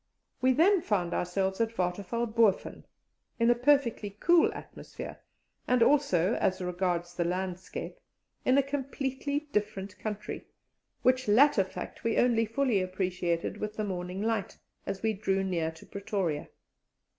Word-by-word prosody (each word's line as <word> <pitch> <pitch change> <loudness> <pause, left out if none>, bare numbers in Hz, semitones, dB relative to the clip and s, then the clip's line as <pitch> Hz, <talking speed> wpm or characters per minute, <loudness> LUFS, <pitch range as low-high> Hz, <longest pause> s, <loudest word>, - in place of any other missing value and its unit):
We 260 0 +4
then 360 +7 +4
found 180 - 0
ourselves 190 +3 -1
at 230 0 -1
Waterfall 195 +6 -1
Boven, 220 -3 +1 0.5
in 230 +1 +5
a - - +7
perfectly 245 -4 +2
cool 345 -1 +5
atmosphere, - - -9 0.5
and 250 -1 +4
also, 230 - +3
as 185 0 +1
regards 175 -1 -1
the 175 - 0
landscape, 185 +1 -4 0.4
in 255 +2 +4
a 280 - +5
completely 275 +1 -2
different 205 -3 -2
country, 210 -1 -5 0.6
which 255 -1 +3
latter 230 0 +5
fact 190 - -8
we 230 -1 0
only 230 -2 +3
fully 230 -3 +1
appreciated 185 -2 -2
with 215 0 -4
the 215 - -1
morning 185 0 -4
light, 220 -4 -1 0.3
as 195 - -4
we 220 0 +2
drew 195 -1 0
near 170 -4 0
to 160 - -13
Pretoria. 195 -6 -3
210 Hz, 140 wpm, -29 LUFS, 185-245 Hz, 0.6 s, a